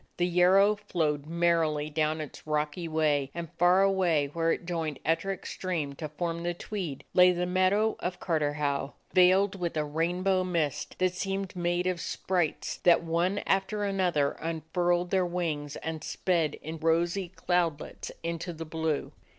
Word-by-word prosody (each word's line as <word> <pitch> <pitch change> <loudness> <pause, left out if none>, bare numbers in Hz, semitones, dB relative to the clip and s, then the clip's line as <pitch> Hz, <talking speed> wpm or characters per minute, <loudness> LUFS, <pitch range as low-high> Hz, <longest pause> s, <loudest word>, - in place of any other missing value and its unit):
The 175 - +2
Yarrow 185 +4 +5
flowed 155 -8 -1
merrily 165 -3 +1
down 155 +1 0
its 150 0 -9
rocky 150 +3 -1
way, 150 -4 +1
and 170 -2 -6
far 180 +2 +5
away, 175 -7 +2
where 165 0 +1
it 175 - -2
joined 165 -5 -2
Ettrick 190 +4 -1
Stream 165 -7 -3
to 155 +2 -6
form 165 +2 -3
the 175 0 -2
Tweed, 175 -7 -5
lay 180 0 +7
the 180 0 -1
meadow 185 +4 +2
of 180 0 -3
Carterhaugh, 145 -4 -1 0.2
veiled 190 +2 +4
with 170 -2 -2
a 150 - +1
rainbow 180 +5 0
mist 165 -6 -2
that 185 -1 +1
seemed 195 +1 -3
made 175 0 0
of 180 -2 -1
sprites 175 -5 -1
that 175 -1 +4
one 170 +4 0
after 195 +2 0
another 180 -8 +1
unfurled 175 +2 -1
their 190 -1 +3
wings 160 -5 -2
and 160 -1 -5
sped 165 -5 0
in 160 +1 -6
rosy 170 +3 +1
cloudlets 170 -4 -1
into 170 +1 -3
the 165 0 -7
blue. 160 -1 -2
170 Hz, 155 wpm, -29 LUFS, 155-180 Hz, 0.2 s, lay